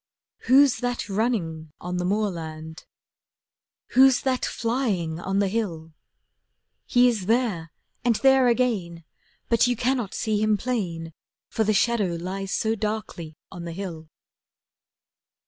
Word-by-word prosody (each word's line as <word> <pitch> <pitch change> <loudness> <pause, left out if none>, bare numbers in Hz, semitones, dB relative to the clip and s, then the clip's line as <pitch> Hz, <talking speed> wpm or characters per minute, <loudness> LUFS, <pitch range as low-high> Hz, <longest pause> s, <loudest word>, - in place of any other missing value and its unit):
Who's 270 0 +6
that 245 -1 -2
running 175 -8 -2
on 180 +1 -4
the 180 - -1
moorland? 165 -6 -3 1.0
Who's 265 0 +5
that 260 -1 0
flying 215 -10 -1
on 195 +2 -2
the 200 0 +2
hill? 175 -7 -3 0.9
He 245 -1 +5
is 215 -6 -1
there—and 225 0 -1
there 265 +1 +4
again, 215 -9 0 0.4
But 230 +1 +3
you 245 - +1
cannot 245 -3 -1
see 215 -1 0
him 215 -1 +2
plain, 175 -10 -3 0.4
For 220 - 0
the 215 0 +1
shadow 205 -5 +1
lies 190 +2 -4
so 220 0 0
darkly 210 -7 -4
on 175 -2 -8
the 170 - -5
hill. 170 -4 -6
205 Hz, 125 wpm, -25 LUFS, 170-240 Hz, 1.0 s, Who's